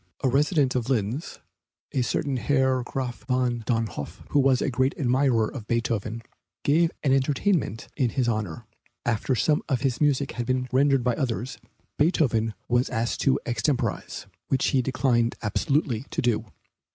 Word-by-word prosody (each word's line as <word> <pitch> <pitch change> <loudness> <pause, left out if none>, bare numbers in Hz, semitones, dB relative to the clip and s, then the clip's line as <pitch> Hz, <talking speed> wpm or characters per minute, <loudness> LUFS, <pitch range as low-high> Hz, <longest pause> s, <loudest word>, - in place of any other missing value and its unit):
A 130 - +3
resident 140 0 +2
of 125 -1 -2
Linz, 120 +4 -1 0.5
a 130 - 0
certain 130 +3 -1
Herr 130 0 +2
Graf 125 0 -4
von 125 -2 +1
Dönhoff, 110 - -3
who 145 - +3
was 135 -2 +4
a 140 - 0
great 130 +2 +1
admirer 125 -4 +2
of 115 -5 -8
Beethoven, 115 -1 -1 0.4
gave 165 +4 +3
an 135 -3 +3
entertainment 135 - +1
in 130 -5 +1
his 125 +1 0
honor. 110 -2 -2 0.4
After 120 +3 0
some 150 +5 +2
of 130 -4 +1
his 130 -1 -1
music 140 -2 +2
had 120 0 -4
been 130 0 0
rendered 135 0 +3
by 125 0 +2
others, 125 0 -3 0.4
Beethoven 120 - +2
was 120 +1 +2
asked 115 0 -1
to 135 - +3
extemporize, 120 - -1 0.2
which 135 - +1
he 130 - +3
declined 125 -2 +1
absolutely 130 +2 0
to - - -2
do. 115 -2 +1
125 Hz, 155 wpm, -26 LUFS, 115-135 Hz, 0.5 s, was